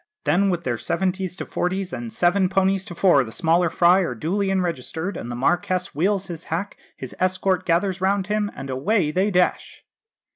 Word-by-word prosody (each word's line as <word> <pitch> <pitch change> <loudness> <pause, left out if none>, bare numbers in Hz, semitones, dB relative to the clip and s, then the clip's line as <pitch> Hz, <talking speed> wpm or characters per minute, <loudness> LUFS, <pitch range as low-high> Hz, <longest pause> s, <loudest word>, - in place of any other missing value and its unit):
Then, 180 +7 +2
with 175 -2 -1
their 120 -4 -2
seventies 185 0 -2
to - - -6
forties, 185 -1 -2
and 120 -2 -5
seven 180 +1 +2
ponies 190 0 +1
to 175 -5 -8
four, 170 -7 +4
the 110 - -9
smaller 170 +4 +2
fry 175 +3 +4
are 170 -10 -1
duly 190 - -1
enregistered, 180 0 -2
and 120 - -6
the 120 - -4
Marquess 180 +7 0
wheels 195 +5 0
his 170 -3 -8
hack, 180 +5 -3 0.2
his 130 - -8
escort 185 0 0
gathers 185 +2 +1
round 195 0 +1
him, 210 0 -1
and 135 - -6
away 150 +5 +1
they 190 +6 +1
dash." 180 -2 0
180 Hz, 185 wpm, -23 LUFS, 160-195 Hz, 0.2 s, four